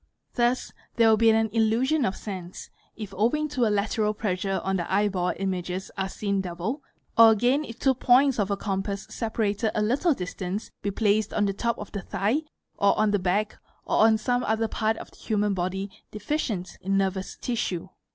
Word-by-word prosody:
Thus 240 +1 +1 0.2
there 230 -1 +5
will 220 - +5
be 225 +1 +5
an 220 -1 +3
'illusion 235 +7 +2
of 190 - -1
sense,' 185 -4 -7 0.2
if 210 -3 -7
owing 245 +10 +1
to 255 -5 +1
a - - +2
lateral 210 +1 0
pressure 195 -2 -1
on 190 0 0
the 175 - -4
eyeball 190 -3 +1
images 185 -1 -3
fe 190 -1 -1
seen 200 0 -1
double, 185 - -4 0.4
or 230 0 +10
again 245 +7 +3
if 230 -5 -9
two 265 +1 +3
points 260 +1 +4
of 200 -1 +1
a 200 - 0
compass 195 0 -3
separated 220 -1 -1
a 215 - +1
little 280 +10 +2
listance 185 +2 -5
be 205 - -1
placed 210 +1 +1
on 205 - +2
the 195 - 0
top 235 +3 -1
of 210 - -8
the 200 - -4
thigh 205 - 0 0.4
or 200 - +4
on 215 -1 +3
the 205 - +2
back 195 +4 0 0.3
or - - 0
on 220 -1 +4
some 245 +2 0
other 220 +1 +1
part 220 0 0
of - - -9
the - - -19
human 210 -2 0
body 190 +2 -2 0.2
deficient 210 - -3
in 195 +1 0
nervous 190 -1 -1
tissue. 190 -8 -2
210 Hz, 190 wpm, -26 LUFS, 195-230 Hz, 0.4 s, or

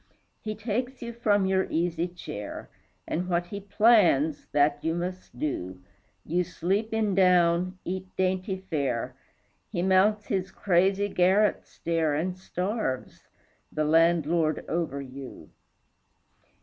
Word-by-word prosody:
He 215 -1 -4
takes 245 +4 -3
you 235 0 -5
from 205 -4 +2
your 190 0 +1
easy 170 +1 0
chair, 135 - -8 0.4
And 180 +3 -2
what 175 0 +1
he 200 +3 -6
plans, 195 - +3
that 145 0 +2
you 165 +1 0
must 180 -5 -5
do. 95 -11 -3 0.5
You 175 +3 +1
sleep 195 +6 -1
in 220 -2 +1
down, 180 -1 +3
eat 185 +1 -4
dainty 190 +1 0
fare, 145 -10 -2 0.5
He 175 - -2
mounts 200 +3 +3
his 190 0 -1
crazy 195 +2 +2
garret 195 +2 +2
stair 165 -3 -1
And 180 +4 -1
starves, 185 - -4 0.4
the 155 0 -1
landlord 165 0 +2
over 160 -5 -2
you. 135 0 -10
180 Hz, 125 wpm, -27 LUFS, 160-195 Hz, 0.5 s, plans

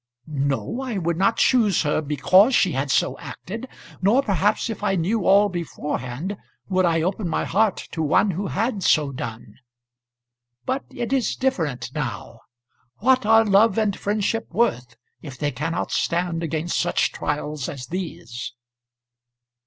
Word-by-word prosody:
"No; 140 - -2
I 250 -6 -3
would 170 -2 -1
not 195 +5 +2
choose 220 -9 +3
her 150 0 +1
because 185 - +4
she 185 - +3
had 135 0 -2
so - - +1
acted; 225 +7 -7 0.3
nor 225 +9 +4
perhaps 205 0 +1
if 225 -4 -5
I 200 -2 +1
knew 190 +4 0
all 200 +2 +6
beforehand 165 -1 -4 0.3
would 185 -1 +2
I 165 -2 +2
open 185 +1 -1
my - - -1
heart 210 +1 +2
to 160 - -3
one 160 +6 +3
who 190 +3 -3
had 215 +1 -1
so 150 -5 +3
done. 115 -4 -7 1.1
But 265 +2 -2
it 240 +2 -4
is 265 -3 +1
different 160 - -2
now. 120 -5 -5 0.6
What 255 0 +2
are 225 0 +6
love 205 +1 +4
and 210 -3 +1
friendship 215 +2 -1
worth 125 - 0 0.3
if 140 -5 -9
they 145 +2 -1
cannot 150 +5 -3
stand 170 -1 0
against 165 +1 -2
such 175 0 +1
trials 150 -1 -3
as 130 -3 -6
these?" 125 -9 -6
180 Hz, 150 wpm, -23 LUFS, 150-210 Hz, 1.1 s, all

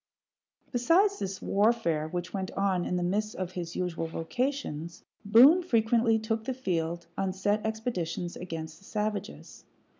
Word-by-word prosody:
Besides 340 - +3
this 190 -1 -4
warfare, 200 -7 +2
which 175 +2 -5
went 190 -2 -2
on 190 -3 +1
in - - -1
the 180 - 0
midst 210 +4 -1
of 185 -1 -4
his 175 -2 -5
usual 170 -2 -2
vocations, 170 - -3 0.2
Boone 250 - +7
frequently 230 -6 +3
took 220 0 -2
the 260 -1 -2
field 170 -7 -2
on 190 -1 0
set 205 +3 0
expeditions 200 -6 -3
against 160 -2 -6
the 195 - -19
savages. 210 -1 -4
195 Hz, 145 wpm, -29 LUFS, 175-225 Hz, 0.2 s, Boone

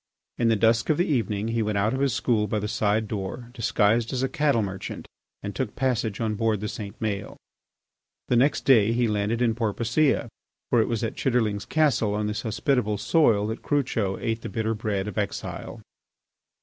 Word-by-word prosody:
In 120 - +3
the 115 - +4
dusk 115 +2 +2
of 155 - +3
the 175 - +2
evening 110 -6 -1
he 115 0 0
went 105 -1 -1
out 105 +4 +1
of 130 - -2
his 140 -1 +2
school 110 -3 +1
by 105 - -1
the 105 0 -2
side 110 0 0
door, 110 +4 -5
disguised 115 -1 +1
as 130 0 -1
a - - +2
cattle 150 -8 +2
merchant 95 -1 -6 0.4
and 100 0 -4
took 120 -4 -3
passage 120 -5 -1
on 110 -2 0
board 110 0 0
the 105 - -3
St. 105 -1 -7
Maël. 100 -3 -3 0.9
The 125 - +2
next 135 +5 +2
day 115 -4 +5
he 120 0 +2
landed 105 +3 0
in 115 -2 +2
Porpoisea, 120 +5 +1 0.4
for 120 - +5
it - - 0
was 115 -1 -2
at 115 - -2
Chitterlings 110 -6 0
Castle 125 -10 +2
on 105 0 -1
this 105 0 -2
hospitable 110 -1 0
soil 110 -6 +3
that 110 +2 -4
Crucho 115 -9 0
ate 115 -1 -2
the - - -6
bitter 110 -1 -1
bread 105 -2 -2
of 105 - -3
exile. - - -4
110 Hz, 195 wpm, -25 LUFS, 105-120 Hz, 0.9 s, day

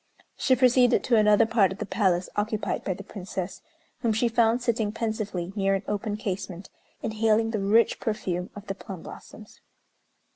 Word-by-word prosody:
She 260 - +3
proceeded 250 0 +4
to 240 - +2
another 210 0 +5
part 220 -4 +3
of 190 - -6
the - - -4
palace 190 -3 +1
occupied 215 +1 -1
by 185 - -2
the 195 - -9
Princess, 190 -2 -6 0.4
whom 230 -2 +1
she 225 +3 +2
found 230 +1 +3
sitting 225 -3 0
pensively 215 -5 -3
near 195 -1 +2
an 195 - -3
open 210 0 -2
casement, 190 -3 -5 0.3
inhaling 220 0 +1
the 220 - -1
rich 210 +4 +3
perfume 185 -5 -2
of 205 0 -9
the 195 - -3
plum 195 -3 -9
blossoms. 215 -1 -12
210 Hz, 170 wpm, -26 LUFS, 195-225 Hz, 0.4 s, another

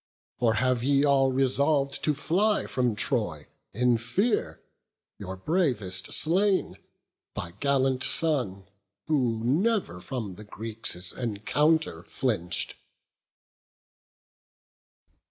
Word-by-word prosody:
Or 115 -2 +2
have 125 0 +1
ye 140 +2 +3
all 135 -2 +3
resolv'd 140 +2 +1
to 150 - +2
fly 195 +9 +1
from 125 -4 0
Troy 105 - -1 0.3
In 120 +1 +2
fear, 195 - 0 0.6
your 95 -1 -6
bravest 110 - -1
slain, 190 +4 +1 0.6
thy 85 - -5
gallant 135 -2 +1
son, 125 - +1 0.4
Who 125 -7 0
never 170 - 0
from 110 -7 -5
the 105 - -9
Greeks' 105 -5 -2
encounter 125 - 0
flinch'd?" 90 -4 -1
130 Hz, 95 wpm, -27 LUFS, 105-150 Hz, 0.6 s, ye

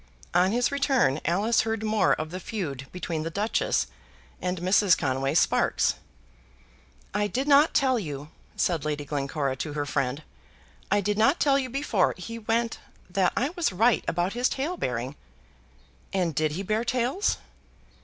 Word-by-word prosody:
On 180 +2 +4
his 245 +4 +1
return 270 - +2
Alice 205 +7 +2
heard 225 -1 -2
more 215 -1 +3
of 155 0 -3
the 185 - -5
feud 150 - -5
between 170 -3 -3
the 160 - -3
Duchess 205 +6 0 0.6
and 180 0 -1
Mrs. 185 +1 +4
Conway 135 +1 -1
Sparkes. - - +3 1.2
"I 205 +1 +1
did 260 +6 -2
not 290 +2 +5
tell 260 -3 +3
you," 150 -5 -6 0.3
said 165 -5 0
Lady 150 -1 -2
Glencora 140 -1 -2
to 150 +3 -4
her 145 -1 -2
friend; 140 +1 -1 0.7
"I 205 +1 +3
did 205 +2 -1
not 275 +9 +4
tell 275 -1 +4
you 260 -2 -3
before 245 -7 +1
he 230 +5 -7
went 230 +1 -1 0.3
that 185 0 +2
I 270 - +1
was 345 - -1
right 225 +6 +3
about 175 +3 0
his 245 +2 +1
tale 295 +7 -2
bearing." 125 - -3 1.0
"And 180 -4 0
did 155 +1 0
he 190 +5 -3
bear 215 +3 0
tales?" 250 - 0
195 Hz, 160 wpm, -26 LUFS, 155-235 Hz, 1.2 s, not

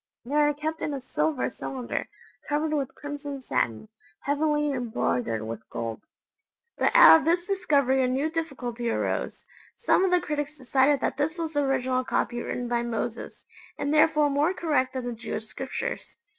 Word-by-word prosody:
They 265 - -6
are 295 0 +4
kept 310 +2 -4
in 295 - -2
a - - -4
silver 265 +2 -1
cylinder, 255 -3 -4 0.4
covered 305 +1 0
with 275 -3 -2
crimson 290 -1 -6
satin, 115 - -1 0.3
heavily 295 +1 +1
embroidered 125 - -1
with 115 0 -7
gold. 115 -1 -4 0.7
But - - +1
out - - +10
of 295 - -6
this 345 +2 +2
discovery 285 -9 +2
a - - +2
new 270 +5 0
difficulty 250 -8 -3
arose. - - -2 0.3
Some 470 - +3
of 380 - +3
the 360 0 +4
critics 300 -2 -3
decided 270 +1 +2
that - - -1
this 305 +4 -1
was 325 -1 -3
the 290 - +1
original 260 -2 +1
copy 240 -1 -1
written 245 0 -3
by 240 0 0
Moses, 235 0 -4 0.3
and 285 +1 -1
therefore 305 -1 +4
more 300 +6 +2
correct 295 -7 0
than 260 -2 -4
the 245 - -3
Jewish 220 -1 -5
Scriptures. 265 +4 -5
280 Hz, 170 wpm, -26 LUFS, 245-305 Hz, 0.7 s, out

